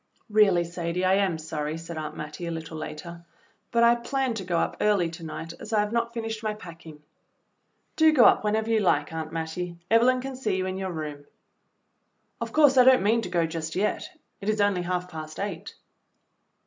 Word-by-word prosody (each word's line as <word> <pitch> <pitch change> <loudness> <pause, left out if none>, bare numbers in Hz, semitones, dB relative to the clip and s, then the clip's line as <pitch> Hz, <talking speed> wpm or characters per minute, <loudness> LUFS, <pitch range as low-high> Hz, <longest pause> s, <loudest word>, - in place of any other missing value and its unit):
"Really, 200 -5 +5
Sadie, 170 +1 -3
I 185 - +4
am 195 -4 +2
sorry," 155 0 -4
said 165 0 -8
Aunt 155 -1 -5
Mattie, 155 +3 -6
a - - -3
little 160 0 -6
later, 170 +2 -7 0.5
"but 235 0 +2
I 235 0 +7
planned 240 +1 -1
to 195 - -4
go 175 -2 -1
up - - -1
early 195 -6 +2
to 165 0 -10
night, 165 +1 -6
as 215 - -9
I 215 - +4
have 210 0 -2
not 235 0 0
finished 225 -2 -4
my 215 -1 -2
packing." 165 -6 -12 0.9
"Do 315 0 +6
go 260 -6 +6
up - - +5
whenever 215 +1 0
you 225 - +4
like, 155 -6 +1
Aunt 160 -1 -4
Mattie. 165 +2 -4 0.2
Eve 230 - +7
lyn 255 +1 +4
can 265 +1 -5
see 220 -7 -1
you 185 - -1
in 190 0 -3
your 190 -1 -3
room." 150 -3 -6 1.2
"Of - - -3
course 290 -3 +5
I - - +9
don't 255 -4 +6
mean 225 +3 +3
to 200 - -5
go 170 -2 +1
just 160 -1 -5
yet, 205 +3 -1 0.3
it 200 - -3
is 215 0 0
only 205 -3 +2
half 180 0 -2
past 155 -2 -8
eight." 195 -5 -5
180 Hz, 210 wpm, -26 LUFS, 165-220 Hz, 1.2 s, I